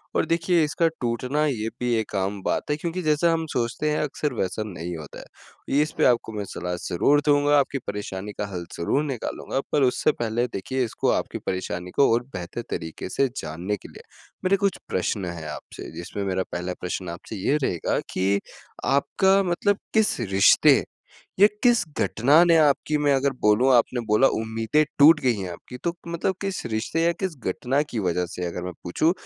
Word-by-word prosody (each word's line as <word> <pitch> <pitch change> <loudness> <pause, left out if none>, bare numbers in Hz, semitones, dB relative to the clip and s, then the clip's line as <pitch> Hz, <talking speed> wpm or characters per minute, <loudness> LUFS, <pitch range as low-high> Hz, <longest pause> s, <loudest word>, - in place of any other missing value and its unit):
और - - +2
देखिए 165 +1 +2
इसका 150 +2 +1
टूटना 125 +5 0
ये 115 -6 -1
भी 125 -1 0
एक 110 -1 -5
आम 95 +1 -1
बात 150 - -1
है - - +2
क्योंकि 170 +3 -3
जैसा 155 +2 +2
हम 165 0 -1
सोचते 125 +5 -1
हैं 150 - 0
अक्सर 145 -1 -2
वैसा 100 0 -2
नहीं 90 -3 -6
होता 75 -3 -10
है। - - -9
इस 155 - 0
पे - - +3
आपको 120 -2 +2
मैं 105 -1 -4
सलाह 90 -1 -4
ज़रूर 145 +12 +3
दूँगा 145 0 +4
आपकी 140 0 0
परेशानी 100 0 -5
का 105 - 0
हल 85 -1 -4
ज़रूर 135 - +1
निकालूँगा 135 -1 -3
पर 145 - +3
उससे 125 - +3
पहले 120 +1 0
देखिए 130 +7 -2
इसको 110 - -1
आपकी - - -1
परेशानी 90 -1 -3
को 140 - +5
और 120 +1 +1
बेहतर 90 +6 -5
तरीके 80 +2 -5
से 135 - +1
जानने 85 +7 -3
के - - -13
लिए - - -12 0.4
मेरे 195 +2 +4
कुछ 200 0 0
प्रश्न 95 +1 -1
हैं 85 -3 -6
आपसे। - - -8
जिसमें 85 +4 -5
मेरा 95 -1 -1
पहला 90 +1 -3
प्रश्न 90 0 -4
आपसे 85 +6 -7
ये 120 +9 +1
रहेगा 85 -9 0
कि 100 +2 +1 0.5
आपका 190 +8 +3
मतलब 195 +3 +1 0.2
किस 220 -8 +2
रिश्ते 95 0 +6 0.7
या 205 - +10 0.2
किस 240 -2 +4
घटना 140 +9 +4
ने 170 -1 +5
आपकी 150 0 +3
मैं 145 -1 +4
अगर 135 +1 +1
बोलूँ 105 +5 +4
आपने 120 +1 +2
बोला 105 +5 +4 0.2
उम्मीदें 115 +7 +1
टूट 150 +2 +8
गई 125 -2 +2
है 95 -3 -5
आपकी 125 +8 -10
तो 170 - 0
मतलब 170 +3 -1
किस 195 -1 -3
रिश्ते 120 +9 -1
या 170 - +3
किस 185 -5 -2
घटना 130 +9 0
की 115 - -3
वजह 90 +1 0
से 90 - -3
अगर 85 +1 -5
मैं 90 - -4
पूछूँ, 155 - +1
125 Hz, 190 wpm, -24 LUFS, 95-150 Hz, 0.7 s, या